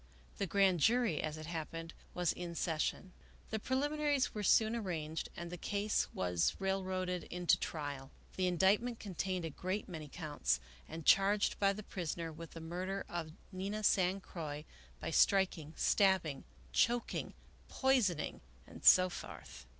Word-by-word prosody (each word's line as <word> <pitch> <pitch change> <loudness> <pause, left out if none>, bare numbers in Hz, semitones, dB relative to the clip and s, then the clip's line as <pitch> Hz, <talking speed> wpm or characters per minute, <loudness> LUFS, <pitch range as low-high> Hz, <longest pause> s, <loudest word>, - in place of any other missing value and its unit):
The 200 - 0
grand 190 -1 +3
jury, 230 - +3
as 155 0 -3
it 155 - -7
happened, 165 +1 -5 0.2
was 180 -2 +1
in 175 -1 -6
session. 165 +3 -1 0.4
The 220 - -1
prehminaries 290 +3 +1
were 210 - -3
soon 220 +3 +4
arranged 165 -8 -3
and 170 0 -6
the 180 - -6
case 205 +3 0
was 90 -2 +1
railroaded 185 -2 -1
into 180 0 +2
trial. 145 -4 -4 0.3
The 185 -1 +1
indictment 200 +7 +2
contained 185 -2 -3
a 165 - -4
great 185 +7 -3
many 160 -5 -7
counts, 145 - -1 0.3
and 160 0 -7
charged 200 +1 +4
the 200 +1 +1
prisoner 170 -2 -3
with 165 +1 -10
the 165 - -7
murder 185 +4 -3
of 160 -3 -5 0.2
Nina 200 +3 -3
San 190 -1 +3
Croix 150 -5 -6 0.3
by - - -4
striking, 190 -6 +3
stabbing, 190 -8 +2 0.3
choking, 240 - +1 0.3
poisoning, 245 - +1 0.2
and - - -13
so 185 0 +8
forth. 175 - -9
180 Hz, 140 wpm, -35 LUFS, 160-200 Hz, 0.4 s, so